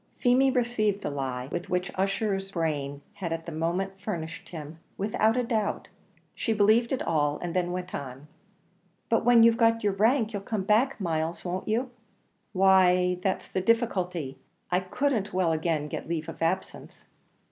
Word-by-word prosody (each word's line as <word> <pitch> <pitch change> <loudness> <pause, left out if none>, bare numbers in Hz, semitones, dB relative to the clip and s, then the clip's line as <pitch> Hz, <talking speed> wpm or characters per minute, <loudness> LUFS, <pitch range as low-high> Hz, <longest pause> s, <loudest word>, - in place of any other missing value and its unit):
Feemy 255 +2 +4
received 235 -5 0
the - - -2
lie 130 -2 -3
with 175 0 -4
which 180 +1 -1
Ussher's 195 0 -1
brain 145 -4 -2
had 170 -4 -5
at 165 0 -3
the 170 - -6
moment 180 +5 -2
furnished 165 -6 -5
him, 155 -1 -8 0.2
without 215 +3 +1
a 250 - +2
doubt; 220 -3 -1 0.4
she 225 - -1
believed 220 +3 +3
it 265 - -1
all, 145 -2 +1
and 175 -1 -5
then 175 -1 +1
went 180 0 -5
on. 135 +1 -6 0.8
"But - - +2
when 240 -1 +7
you've 230 0 +5
got 230 -1 +3
your 205 -1 +2
rank, 220 +3 +2
you'll 200 - -3
come 200 0 -3
back, 225 +7 +2
Myles, 165 -2 -2
won't 180 +2 -3
you?" 240 +4 0 0.6
"Why 185 -2 +4
that's 190 0 -1
the 185 - -2
difficulty 180 - 0 0.3
I 180 - +3
couldn't 215 +2 -1
well 180 -3 +2
again 160 -2 0
get 150 - -6
leave 165 -2 -2
of - - -8
absence." 185 +3 -3
190 Hz, 170 wpm, -27 LUFS, 165-220 Hz, 0.8 s, when